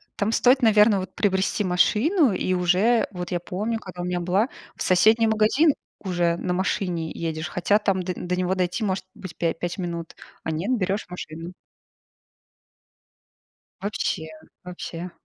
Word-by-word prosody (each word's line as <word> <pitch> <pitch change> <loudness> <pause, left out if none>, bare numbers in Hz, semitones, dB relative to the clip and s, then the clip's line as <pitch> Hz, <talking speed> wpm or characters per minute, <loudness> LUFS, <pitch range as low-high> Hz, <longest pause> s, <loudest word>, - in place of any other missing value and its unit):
Там 205 +2 0
стоит, 255 +3 +4
наверно, 210 -2 +5
вот 185 - -8
приобрести 195 +1 +1
машину 225 - +3
и 185 0 0
уже 185 +7 +3
вот 180 -1 -6
я 175 - 0
помню, 215 +6 -3
когда 180 -3 -8
у - - -3
меня 180 0 -1
была, 185 +7 +1 0.3
в - - -12
соседний 220 +5 +4
магазин 220 +8 +4 0.3
уже 175 -3 0
на 180 0 -2
машине 180 -3 -1
едешь, 160 0 -3
хотя 200 +4 +2
там 190 -3 0
д 180 - -2
до 180 +1 -2
него 185 +1 0
дойти 180 +4 -1
может 190 -2 -1
быть 185 -3 -9
пя- 165 -1 +1
5 175 +3 -4
минут, 170 -2 -5 0.3
а 160 - -2
нет, 195 +11 0
берешь 195 +2 -1
машину. 170 0 -7 2.3
Вообще, 190 -5 -2 0.4
вообще 180 0 -6
185 Hz, 155 wpm, -24 LUFS, 175-210 Hz, 2.3 s, наверно